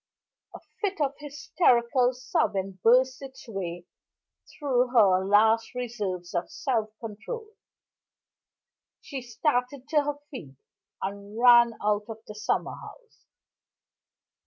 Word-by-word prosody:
A - - -8 0.2
fit 395 -4 -1
of 280 -2 +1
hysterical 265 -4 +2
sobbing 195 -6 -1
burst 255 +3 +4
its 270 -1 -11
way 175 -5 -5 0.6
through 255 -4 0
her 200 -7 +4
last 220 +4 +3
reserves 205 -8 -4
of 175 0 -2
self 230 -6 -1
control; 245 - -7 1.5
she 275 -3 -7
started 250 +2 -1
to 300 -1 +3
her 290 0 -3
feet, 145 - -9 0.5
and 200 +2 -6
ran 240 -1 +6
out 210 0 +1
of 225 - -6
the 210 - -9
summer 210 0 -1
house. 470 -3 -14
240 Hz, 110 wpm, -27 LUFS, 205-270 Hz, 1.5 s, ran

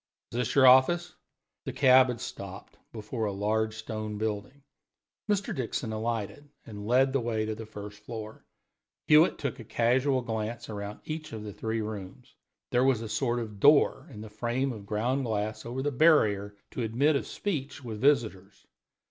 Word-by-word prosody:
Is 115 - -4
this 125 -1 -1
your 135 -2 +6
office?" 130 +7 +5 0.5
The - - -3
cab 130 -1 +6
had 125 -2 -3
stopped 100 -5 -8
before 110 +1 -4
a 105 - -1
large 110 +2 -1
stone 110 -1 -5
building. 110 +6 -4 0.7
Mr. 205 -1 0
Dixon 125 -2 -3
alighted 115 +5 -3 0.2
and 105 -2 -8
led 130 +3 +3
the 135 - +2
way 110 -2 -1
to 110 - -2
the 110 0 -8
first 105 -1 -9
floor. 110 0 -8 0.6
Hewitt 155 +3 +5
took 140 -4 -4
a - - -7
casual 125 +4 +1
glance 115 +1 -4
round 105 -1 -6
each 155 -2 -6
of 110 -1 -6
the 105 -1 -7
three 110 +2 -2
rooms. 105 -3 -7 0.4
There 125 +1 +3
was 130 -4 +2
a - - -5
sort 120 +2 0
of 110 -4 -5
door 145 +5 +4
in 105 - -9
the 110 - -8
frame 120 +4 -1
of 100 -3 -10
ground 120 +6 0
glass 110 0 -3
over 130 +3 -3
the 145 - 0
barrier 105 -9 +3
to - - -4
admit 125 +7 +2
of 140 - -1
speech 145 -8 -4
with 110 -3 -6
visitors. 105 -8 +1
115 Hz, 175 wpm, -28 LUFS, 105-130 Hz, 0.7 s, your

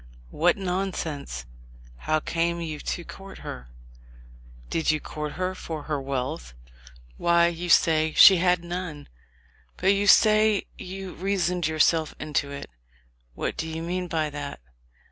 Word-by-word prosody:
What 175 +5 +2
nonsense! 180 - -3 0.5
How 155 - 0
came 170 +2 -1
you 155 -3 -4
to 175 - -4
court 195 +3 -11
her?... 60 0 -7 1.0
Did 160 - -1
you 155 0 +3
court 150 0 -6
her 185 0 -2
for 160 -4 -6
her 150 -2 -2
wealth? 135 - -4 0.6
Why, 170 0 +4
you 175 +1 -5
say 160 -1 +4
she 190 -2 +9
had 180 0 +2
none. 175 -4 -5 0.7
But 190 +2 +3
you 200 +1 0
say 215 0 +5
you 190 0 -7
reasoned 180 -3 0
yourself 160 0 +2
into 145 -1 -1
it. 140 - -8 0.6
What - - -3
do 160 - -3
you 160 +1 -5
mean 180 +1 -2
by 155 -3 -1
that? 145 -1 -6
165 Hz, 140 wpm, -26 LUFS, 150-185 Hz, 1.0 s, she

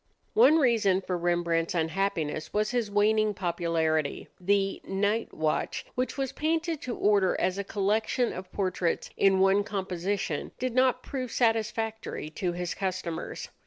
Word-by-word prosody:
One 420 -8 +6
reason 225 - +3
for 185 -1 -3
Rembrandt's 170 -1 0
unhappiness 160 -2 -1
was 215 +1 0
his 240 -4 0
waning 210 +1 +2
popularity. 165 -4 -1
The 195 +1 +1
"Night 205 +4 0
Watch," 155 -1 -1
which 255 +3 -2
was 270 -2 -1
painted 320 0 -1
to 245 - -4
order 200 -3 +2
as 185 +1 0
a - - -1
collection 215 +5 0
of 185 0 -8
portraits 185 -3 -1
in 195 -1 +4
one 195 +1 +4
composition, 190 -4 -3
did 255 -1 -2
not 255 0 +3
prove 255 -3 -4
satisfactory 225 -6 -1
to 175 +2 -2
his 175 0 -3
customers. 185 -3 -4
195 Hz, 140 wpm, -28 LUFS, 175-225 Hz, -, One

